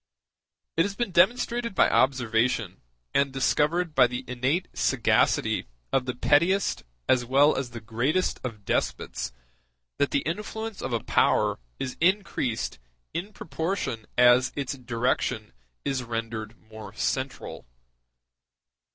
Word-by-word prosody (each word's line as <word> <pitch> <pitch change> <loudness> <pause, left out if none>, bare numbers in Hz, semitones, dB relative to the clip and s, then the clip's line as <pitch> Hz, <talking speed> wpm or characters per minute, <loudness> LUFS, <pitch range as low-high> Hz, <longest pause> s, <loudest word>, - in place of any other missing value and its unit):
It - - +5
has 195 +3 0
been 240 -2 -2
demonstrated 235 +4 +2
by - - +5
observation, 120 -6 +1 0.3
and 140 -1 +2
discovered 150 +5 +1
by 130 -4 +6
the 125 +1 -5
innate 130 +9 0
sagacity - - +2 0.3
of 130 -1 +1
the 125 - -2
pettiest 170 +10 +2 0.3
as 125 -1 +3
well 140 +5 +4
as 130 -2 -2
the 120 -1 -8
greatest 125 - 0
of 110 -5 -6
despots, - - -2 0.7
that 140 - +3
the 140 - +1
influence 210 +5 -4
of - - -3
a 115 -2 -1
power - - +2 0.2
is 130 - -4
increased 175 - 0 0.3
in 190 +5 -4
proportion 160 - -3
as 125 +1 +6
its 140 -1 -3
direction 120 -3 -1 0.3
is 135 -2 0
rendered 115 -1 -5
more 110 -2 -11
central. 130 - -3
130 Hz, 125 wpm, -26 LUFS, 120-170 Hz, 0.7 s, by